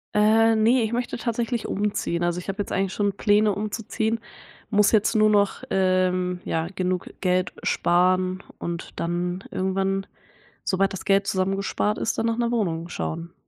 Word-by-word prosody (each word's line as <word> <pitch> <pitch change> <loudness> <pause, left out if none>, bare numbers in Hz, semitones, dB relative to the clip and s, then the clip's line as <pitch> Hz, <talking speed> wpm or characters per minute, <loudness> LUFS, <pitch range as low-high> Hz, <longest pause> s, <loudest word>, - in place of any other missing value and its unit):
Äh, 220 +2 +5
ne, 230 +3 +4
ich 220 - -2
möchte 245 +1 -2
tatsächlich 235 0 -2
umziehen. 200 -4 -1
Also, 175 0 0
ich 180 - -10
habe 195 +1 -4
jetzt - - -5
eigentlich 195 -1 0
schon 205 -1 0
Pläne 210 +1 +3
umzuziehen. 220 +2 -2 0.5
Muss 210 -2 +4
jetzt 215 -1 +3
nur 215 0 +5
noch, 205 -2 +2
ähm 185 -1 +1
ja, 160 0 -1
genug 185 -1 -1
Geld 185 -1 +1
sparen. 185 +1 +2 0.2
Und 170 -1 -5
dann 175 +2 -2
irgendwann, 195 +1 -1 0.6
sobald 195 +1 +1
das 190 - -7
Geld 195 0 +3
zusammengespart 195 +2 0
ist, - - -1
dann 225 - +1
nach 230 0 0
'ner 235 -1 0
Wohnung 175 -7 -1
schauen. 165 +1 -4
195 Hz, 160 wpm, -24 LUFS, 185-215 Hz, 0.6 s, Äh